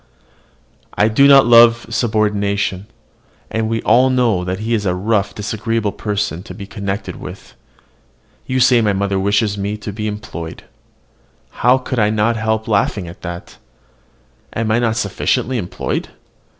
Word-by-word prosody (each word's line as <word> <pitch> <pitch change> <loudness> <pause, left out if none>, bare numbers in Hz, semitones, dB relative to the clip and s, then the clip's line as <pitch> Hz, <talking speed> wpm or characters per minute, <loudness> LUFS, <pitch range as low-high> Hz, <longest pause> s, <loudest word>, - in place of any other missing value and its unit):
I 105 - +3
do 140 +6 +5
not 140 -1 +7
love 115 0 +6
subordination; 105 -3 0 0.6
and 110 0 -1
we 115 0 -2
all 125 +4 +4
know 120 -8 +1
that 95 +1 -3
he 115 +2 -1
is 105 -3 0
a 90 - +1
rough, 100 +1 0
disagreeable 110 +1 -2
person 100 -7 -3
to 105 - -10
be 100 - -8
connected 100 0 -5
with. - - -10 0.9
You 130 0 0
say 125 -1 +5
my 105 -2 +1
mother 100 0 -1
wishes 100 +1 +1
me 100 +2 -3
to 105 -1 -7
be 105 +1 -4
employed. 95 -6 -7 1.0
I 125 +2 +5
could 130 -1 -4 0.2
not 110 +2 +2
help 110 0 -1
laughing 100 -3 0
at 85 - -11
that. 85 0 -8 0.9
Am 110 -1 -1
I 115 - +3
not 115 -2 0
sufficiently 125 +3 -1
employed? 90 -4 -4
105 Hz, 150 wpm, -18 LUFS, 100-115 Hz, 1.0 s, not